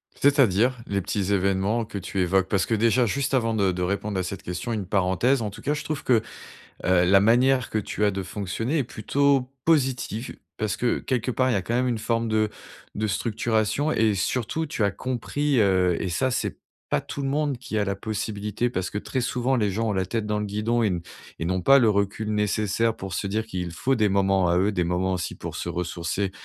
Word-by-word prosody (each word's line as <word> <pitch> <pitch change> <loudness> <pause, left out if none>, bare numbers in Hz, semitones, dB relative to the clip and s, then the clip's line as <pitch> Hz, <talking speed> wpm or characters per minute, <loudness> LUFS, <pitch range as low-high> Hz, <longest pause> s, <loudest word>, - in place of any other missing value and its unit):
C'est-à-dire, 130 -4 +3
les 100 -1 -1
petits 100 +1 -1
événements 100 +4 +1
que 100 - -7
tu 95 0 -4
évoques? 95 +1 +2
Parce 100 -1 +1
que 115 - 0
déjà 115 +3 +3
juste 140 +5 -1
avant 115 -3 +2
de 100 -3 +2
de 90 0 -4
répondre 100 +2 -1
à - - 0
cette 95 +2 -6
question, 90 +7 -4
une 105 -4 -2
parenthèse 100 +7 +2
en 105 - -2
tout 110 +3 -11
cas, 145 - 0
je 150 - -4
trouve 155 -2 -4
que, 115 -4 +3 0.6
heu, 90 -1 +4
la 95 +2 +5
manière 125 +3 +3
que 110 - 0
tu 105 +1 -2
as 105 - +4
de 95 0 -3
fonctionner 105 - -2
est 135 - +1
plutôt 135 +4 +1 0.2
positive, 130 -6 0 0.2
parce 105 -2 -1
que 120 - +1
quelque 125 -1 -1
part, 130 +1 +1
il - - +2
y - - +2
a 95 - 0
quand 115 +6 -3
même 125 +1 +2
une 115 -2 -1
forme 115 +1 -1
de 110 -1 +1 0.4
de 110 +1 -1
structuration 110 +6 0
et 110 -2 +2
surtout 125 - -1
tu 120 - -3
as 100 - +3
compris, 130 +5 -1
heu, 95 -3 +3
et 95 - -1
ça 130 +9 0
c'est 125 - -2 0.3
pas - - +2
tout 140 - -6
le 135 - -1
monde 145 -2 0
qui 110 -3 -5
a 105 - +2
la 100 0 -2
possibilité, 105 +2 -2
parce 90 -5 -2
que 105 - -3
très 130 +4 -3
souvent 125 +2 0
les 105 -4 +1
gens 110 +3 -1
ont - - +1
la 95 -1 0
tête 110 +2 -2
dans 105 0 0
le 105 - -2
guidon 110 +4 0
et 105 - +3
n 90 -2 -1 0.4
et - - -1
n'ont 90 +1 -1
pas 140 +6 +7
le 115 - +4
recul 100 +2 -1
nécessaire 105 +2 +1
pour 95 -1 -6
se 100 - -2
dire 110 +3 -1
qu'il 90 -5 -4
faut 135 +10 0
des 105 -2 +3
moments 95 -2 +2
à 85 +1 +3
eux, 100 +3 +2
des 90 -3 0
moments 90 +2 0
aussi 85 -3 -3
pour - - -7
se - - -4
ressourcer, 90 +2 -2
105 Hz, 235 wpm, -25 LUFS, 95-120 Hz, 0.6 s, pas